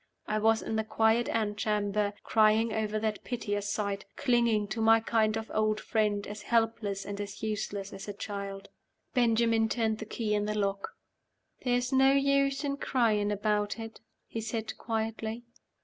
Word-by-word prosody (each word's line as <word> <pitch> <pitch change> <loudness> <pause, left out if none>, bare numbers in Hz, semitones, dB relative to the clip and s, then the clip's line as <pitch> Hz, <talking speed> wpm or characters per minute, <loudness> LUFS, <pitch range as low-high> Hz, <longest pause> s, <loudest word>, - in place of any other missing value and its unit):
I 215 0 0
was 225 +1 +3
in 220 - -2
the 220 - +1
quiet 220 +2 +2
antechamber, 210 -1 0
crying 220 0 +3
over 215 0 -1
that 215 -1 -2
piteous 205 -4 -3
sight; 200 -2 -2
clinging 235 -6 +2
to 220 +3 -3
my 225 0 +6
kind 220 -1 +1 0.2
old 215 0 +1
friend 210 -3 0
as 210 +1 -7
helpless 225 -4 0
and 200 0 -4
as 200 +1 -7
useless 205 -2 -3
as 195 +1 -8
a 205 - -4
child. 200 -1 -6 0.4
Benjamin 230 -2 +3
turned 220 -2 0
the 220 - -5
key 215 0 -2
in 205 0 +1
the 210 0 -2
lock. 195 -1 -2 0.7
"There's 245 +1 +1
no 265 +1 +5
use 275 0 +2
in 280 -1 -1
crying 215 -7 +1
about 210 0 0
it," 225 -1 -8 0.2
he 225 - -5
said, 225 0 -4
quietly. 225 0 -3
220 Hz, 160 wpm, -30 LUFS, 205-230 Hz, 0.7 s, my